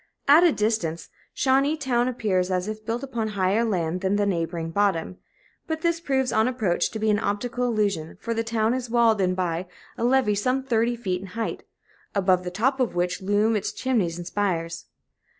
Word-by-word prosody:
At 300 +5 +7
a 345 - +6
distance, 210 - -1 0.3
Shawneetown 265 -2 +2
appears 200 -7 0
as 185 0 -1
if 215 0 -5
built 230 +4 -3
upon 235 -5 -2
higher 200 +1 +1
land 180 -5 -1
than 190 +1 +1
the 205 0 +2
neighboring 165 -3 -2
bottom; 185 -2 0 0.5
but 320 0 -3
this 335 -1 +1
proves, 265 -5 0
on 220 +2 +3
approach, 220 -9 0
to - - -6
be 215 0 +1
an 205 - +2
optical 240 +4 -2
illusion, 205 -9 -1
for 230 - -3
the 225 0 -1
town 225 0 +1
is 250 -2 -3
walled 230 -3 +3
in 185 -1 +1
by 180 -1 -2 0.3
a - - -1
levee 245 -3 +3
some 255 +6 0
thirty 240 -1 +1
feet 185 -6 -3
in 195 - -8
height, 225 - -3 0.5
above 185 -2 +3
the 180 - -3
top 250 +9 0
of 250 -8 0
which 180 +2 -1
loom 205 +3 +2
its 210 - -1
chimneys 210 -11 -1
and 175 - -6
spires. 175 -4 -2
215 Hz, 190 wpm, -25 LUFS, 185-245 Hz, 0.5 s, At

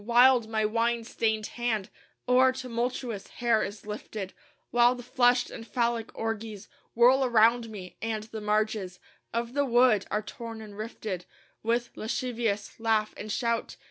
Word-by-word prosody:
Wild 240 0 +5
my 220 -1 +1
wine 230 +2 +1
stained 220 -1 -1
hand 225 -5 -2 0.4
O'er 255 +1 +6
tumultuous 245 -3 -3
hair 235 -2 +1
is 205 +2 -5
lifted; 210 -2 -6 0.4
While 240 +1 +5
the 245 - -9
flushed 245 0 +3
and 225 - -8
Phallic 235 -2 0
orgies 220 -2 -4 0.3
Whirl 250 +3 +6
around 235 -1 +4
me; 190 -4 -9
and 220 -1 -2
the 220 0 -7
marges 210 -3 0 0.3
Of 235 +1 -2
the 285 +1 +2
wood 240 -5 +4
are 210 0 -1
torn 230 -1 -7
and 210 -2 -10
rifted 210 -4 -5 0.4
With 235 +2 0
lascivious 225 -3 -2
laugh 220 -1 +1
and 215 - -6
shout. 235 +1 -1
225 Hz, 145 wpm, -28 LUFS, 215-240 Hz, 0.4 s, O'er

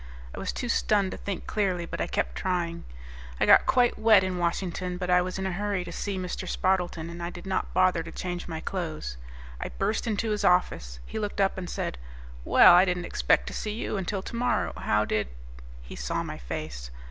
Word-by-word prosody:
I - - -7
was - - -2
too 245 - -4
stunned 205 -4 +2
to - - -5
think 200 -3 -5
clearly, 185 -5 0
but - - -5
I - - 0
kept 60 - -1
trying. 170 - -2 0.5
I - - +3
got - - +7
quite 245 -3 +3
wet 215 -3 +6
in 185 -1 -2
Washington, 180 +1 -2
but 180 -1 -2
I 180 0 +6
was 185 +1 -3
in 190 - -3
a 190 - -1
hurry 200 0 -1
to 175 - -8
see 200 +3 -3
Mr. 180 -1 -4
Spardleton 180 -3 0
and 170 0 -8
I 170 - -2
did 175 0 -10
not 190 0 -1
bother 185 -2 +3
to 165 0 -8
change 175 0 -4
my 160 -2 -5
clothes. 155 - -4 0.4
I - - -4
burst 210 +4 -1
into 220 0 0
his 210 - -1
office. 60 - +2
He - - -5
looked 205 -1 -3
up 195 -1 +3
and 180 -2 -5
said, 60 - -3 0.4
"Well, - - +8
I 180 +1 +8
didn't 180 -2 -1
expect 60 - +2
to - - -8
see 210 - -3
you 225 - -3
until 195 0 -2
tomorrow. 240 +3 -1
How 105 0 +1
did...?" 105 -1 0 0.6
He - - -9
saw - - -2
my - - -6
face. - - -6
180 Hz, 215 wpm, -27 LUFS, 170-195 Hz, 0.6 s, Well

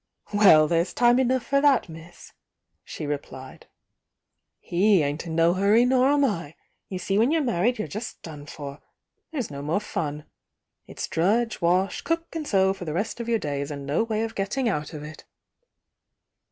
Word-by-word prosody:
"Well, 175 -7 +6
there's 170 +2 0
time 240 +1 +4
enough 260 -1 +1
for 275 0 +2
that, 280 -4 +3
miss!" 165 +1 -13 0.5
she - - -7
replied, 135 -2 -7 1.0
"i^e 190 +1 +4
ain't 145 +4 -3
in 160 - -4
no 165 +1 +4
hurry, 205 +6 +4
nor 255 +1 +3
am 285 0 +3
I! 165 - -3 0.3
You 190 - -4
see 195 +3 0
when 230 +4 +4
you're 320 0 +1
married 240 0 +1
you're 215 - -3
just 215 +3 -6
done 150 -3 -9
for, 140 -1 -8 0.3
— - - -54
there's 260 - -4
no 140 0 -6
more 155 +7 0
fun. 150 -7 -4 0.6
It's - - -6
drudge, 220 +7 0
wash, 180 +3 +1
cook 330 0 -3
and 310 -2 -4
sew 190 -1 +3
for 190 -2 -9
the 155 - -4
rest 205 +7 -3
of 235 0 -4
your 230 - +3
days, 140 -5 -3
and 140 -2 -6
no 145 +7 0
way 220 -1 -1
of 225 - -4
getting 210 +6 -2
out 150 -9 -2
of 150 - -7
it." 155 +1 -10
195 Hz, 185 wpm, -25 LUFS, 155-235 Hz, 1.0 s, Well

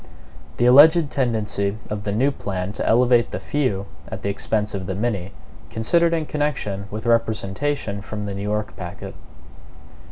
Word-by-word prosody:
57 - - -23
The 120 - +2
Alleged 150 +4 +7
Tendency 110 -5 0
of 105 -1 -4
the 100 - -1
New 130 +7 +2
Plan 95 -5 -4
to - - -3
Elevate 120 0 +4
the - - -4
Few 125 -10 -1 0.2
at - - -7
the 100 - 0
Expense 105 +1 -1
of 95 -2 -4
the 95 - -2
Many 100 -3 -2 0.4
Considered 170 +10 +2
in 165 -2 0
Connection 130 -11 -2
with 110 +2 -6
Representation. 110 0 0
From 105 0 -6
the 100 - -4
New 100 - -5
York 105 +1 -2
Packet. 90 -1 -7
110 Hz, 165 wpm, -22 LUFS, 100-130 Hz, 0.4 s, Alleged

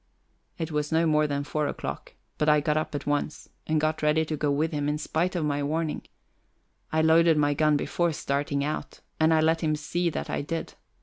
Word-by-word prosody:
It 160 -1 -4
was 150 0 -1
no 165 +1 +3
more 155 -1 +3
than 140 -1 -2
four 150 +1 -1
o'clock, - - -6 0.2
but 150 - +3
I 150 0 +5
got 150 +1 0
up 155 -1 -2
at 140 - -4
once 145 +1 -2 0.2
and 155 -1 +2
got 155 +1 0
ready 155 +1 +2
to 155 - -3
go 150 0 -1
with 150 +3 +1
him, 145 -1 -1
in 150 - 0
spite 165 +4 -1
of 165 -3 0
my 145 -1 0
warning. 155 +2 -1 0.9
I 160 0 +2
loaded 160 0 +5
my 145 -1 +3
gun 150 0 +3
before 170 +3 0
starting 140 -1 -1
out, 150 +2 -4 0.2
and 160 0 +4
I 160 -1 +4
let 160 +1 +2
him 155 -2 +1
see 170 +3 -1
that - - -4
I - - -2
did. 165 +3 -4
155 Hz, 220 wpm, -27 LUFS, 145-160 Hz, 0.9 s, I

